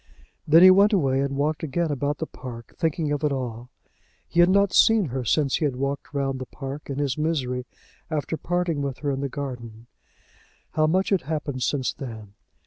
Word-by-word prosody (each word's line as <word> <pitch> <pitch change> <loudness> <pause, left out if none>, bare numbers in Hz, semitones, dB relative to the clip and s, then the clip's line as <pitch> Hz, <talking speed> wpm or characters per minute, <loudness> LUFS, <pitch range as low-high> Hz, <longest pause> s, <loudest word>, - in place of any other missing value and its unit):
Then 165 +3 +7
he 185 - +10
went 200 +3 +5
away 135 -8 +2
and 140 0 -2
walked 150 +2 0
again 160 +2 -1
about 145 +1 -1
the 160 - -3
park, 120 -6 -10
thinking 160 -2 -1
of 145 +1 -2
it 150 - +2
all. 125 -3 -4 0.6
He 170 - -1
had 175 +1 +7
not 200 0 +3
seen 220 -8 +5
her 130 +1 -3
since 135 +4 +1
he 155 - 0
had 135 -4 -1
walked 140 +2 -3
round 135 -2 -2
the 130 - -6
park, 140 +1 -7
in 135 - -3
his 145 -1 -1
misery, 130 -6 -1 0.4
after 155 0 -2
parting 175 -2 -1
with 140 -2 -3
her 140 - +2
in 135 0 -3
the 140 - -2
garden. 120 -5 -7 0.9
How 155 0 +2
much 185 +4 +1
had 195 -3 +2
happened 145 -3 -4
since 130 0 0
then! 110 -6 -9
145 Hz, 200 wpm, -24 LUFS, 130-160 Hz, 0.9 s, he